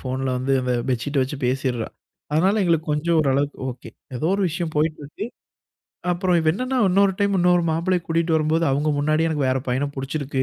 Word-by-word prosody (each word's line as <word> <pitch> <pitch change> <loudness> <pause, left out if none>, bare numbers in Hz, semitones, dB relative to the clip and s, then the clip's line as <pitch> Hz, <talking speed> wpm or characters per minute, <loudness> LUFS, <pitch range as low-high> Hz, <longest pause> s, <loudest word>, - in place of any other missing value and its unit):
ஃபோன்ல 130 0 -3
வந்து 130 +2 -1
அந்த 125 0 0 0.2
பெட்ஷீட்ட 135 +4 -1
வெச்சு 135 +2 -4
பேசிட்ரா. 125 -3 -1 0.4
அதனால 190 +8 +3
எங்களுக்கு 165 -2 +1
கொஞ்சம் 165 +3 +1
ஓரளவுக்கு 140 +1 0
ஒகே. 125 0 -10 0.3
ஏதோ 140 - -1
ஒரு 200 - 0
விஷயம் 165 0 -3
போய்ட்டு 155 +1 0
இருக்கு. 155 +9 -6 0.9
அப்றம் 180 0 +1
இவ 160 - +1
என்னனா 255 +7 -2
இன்னொரு 195 +1 +4
டைம் 200 -1 +2
இன்னொரு 175 0 +4
மாப்பிள்ளைய 175 +2 0
கூட்டிட்டு 165 0 +1
வரும்போது 160 +1 +1
அவங்க 145 +3 +1
முன்னாடியே 155 +3 +2
எனக்கு 150 -4 0
வேற 130 +1 +1
பையனப் 140 +3 -1
புடிச்சிருக்கு. 135 0 -2
155 Hz, 180 wpm, -22 LUFS, 135-175 Hz, 0.9 s, இன்னொரு